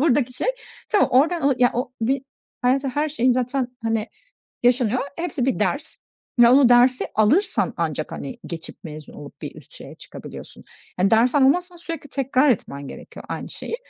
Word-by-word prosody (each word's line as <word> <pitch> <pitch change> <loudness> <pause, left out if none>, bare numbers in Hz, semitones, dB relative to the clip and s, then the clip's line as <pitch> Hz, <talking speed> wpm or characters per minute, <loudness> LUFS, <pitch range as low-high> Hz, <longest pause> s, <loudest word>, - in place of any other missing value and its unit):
buradaki 270 -4 +2
şey. 250 - -3 0.4
Tamam, 415 - +3
oradan 285 +1 +3
ya 245 0 +5
o 250 +1 -2
bir 260 +4 0 0.4
hayatta 270 +2 +2
her 300 +1 +1
şey 255 -4 +2
zaten, 255 +1 -1
hani, 225 -1 -1 0.5
yaşanıyor. 245 -1 +3 0.2
Hepsi 305 -7 -2
bir 265 - +1
ders - - -2 0.4
ve 240 -1 +8
onu 255 0 +6
dersi 245 +1 +4
alırsan 320 - +2
ancak, - - -2
hani, 250 -3 -6
geçip, 165 -2 -8
mezun 155 -2 -9
olup 145 - -12
bir - - -6
üst - - -15
şeye - - -11
çıkabiliyorsun. - - -11 0.3
Hani, 185 +2 +2
ders 230 +3 +4
almazsan 345 +6 +3
sürekli 330 -3 -7
tekrar 270 +1 +2
etmen 140 - -2
gerekiyor - - -11
aynı - - -5
şeyi. - - -5
255 Hz, 165 wpm, -22 LUFS, 235-285 Hz, 0.5 s, ve